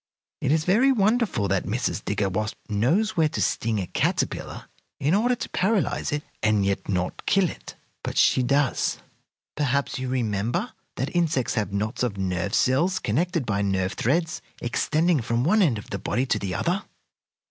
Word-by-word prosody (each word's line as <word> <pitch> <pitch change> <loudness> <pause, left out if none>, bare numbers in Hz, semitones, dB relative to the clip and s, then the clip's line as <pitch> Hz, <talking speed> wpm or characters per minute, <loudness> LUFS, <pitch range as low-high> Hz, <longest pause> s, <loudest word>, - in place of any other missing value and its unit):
It 135 - +1
is 155 0 +2
very 235 +9 +4
wonderful 215 - +2
that 95 0 0
Mrs. 115 0 -1
Digger 100 -1 0
Wasp 105 +3 -2
knows 160 - +1
where 160 -2 +3
to - - -4
sting 110 -1 0
a 95 - -2
caterpillar - - -2 0.3
in 150 +5 +1
order 240 +5 +3
to - - -5
paralyze 195 -3 0
it 150 0 -2 0.2
and 105 -2 +2
yet 100 +1 -1
not 90 -2 -2
kill 195 -2 +4
it. - - -9 0.3
But - - -4
she - - +4
does. 140 +2 +1 0.6
Perhaps 140 -2 0
you 130 0 -3
remember 120 - -1 0.2
that 130 +7 -3
insects 165 -7 +1
have 110 -3 -1
knots 105 +3 -2
of 120 -5 -1
nerve 95 +1 -1
cells, 165 +9 +2
connected 160 - 0
by 100 -2 0
nerve 95 -2 0
threads, 160 +5 0 0.2
extending 155 +6 +1
from 115 +1 0
one 200 +9 +4
end 140 - +3
of 100 - -10
the 100 - -3
body 125 - 0
to 110 -5 0
the 95 -3 -3
other? 180 +4 0
130 Hz, 175 wpm, -25 LUFS, 105-170 Hz, 0.6 s, very